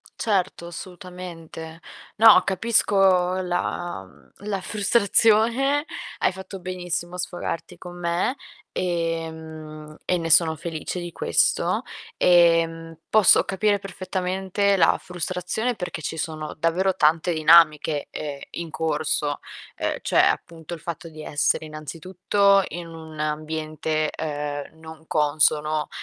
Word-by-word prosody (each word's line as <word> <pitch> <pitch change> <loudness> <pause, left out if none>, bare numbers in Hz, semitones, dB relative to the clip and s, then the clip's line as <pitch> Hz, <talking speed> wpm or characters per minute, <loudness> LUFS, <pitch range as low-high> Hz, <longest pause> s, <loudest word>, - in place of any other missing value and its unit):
Certo 190 -5 -1
assolutamente. 175 -3 -9 0.4
No 220 -1 +8
capisco 190 -3 +2
la 175 - -3
mhmm, 95 - -21 0.2
la 200 -2 -2
frustrazione, 230 +7 +2 0.3
hai - - +2
fatto 190 0 -9
benissimo 180 -1 -4
a - - -9
sfogarti 180 -1 -4
con 175 -1 -10
me 175 +9 0 0.3
e, 165 -2 -1
mhmm, 155 -1 -10
e 180 - +1
ne 165 -1 -3
sono 160 0 +5
felice 165 +2 -5
di 175 0 -6
questo - - +1 0.3
e 165 -2 +3
posso 215 -3 +6
capire 205 +1 +1
perfettamente 190 +1 -1
la 185 - +4
frustrazione 180 +7 -3
perché 180 -5 -6
ci 160 - -4
sono 155 -1 -4
davvero 180 +4 +1
tante 160 +3 +2
dinamiche, 155 -2 +4
ehm, 145 -2 -6
in 170 -1 -6
corso, 150 -2 -1 0.4
ehm, - - -2
cioè, - - +2
appunto 165 0 -2
il 165 - -10
fatto 170 0 -6
di 155 -1 -10
essere 145 +2 0
innanzitutto 185 +6 +1
in 175 0 -7
un 160 -1 -11
ambiente, 155 0 -2
ehm, 145 0 -5
non 160 0 -12
consono 150 0 +2
170 Hz, 120 wpm, -24 LUFS, 155-185 Hz, 0.4 s, No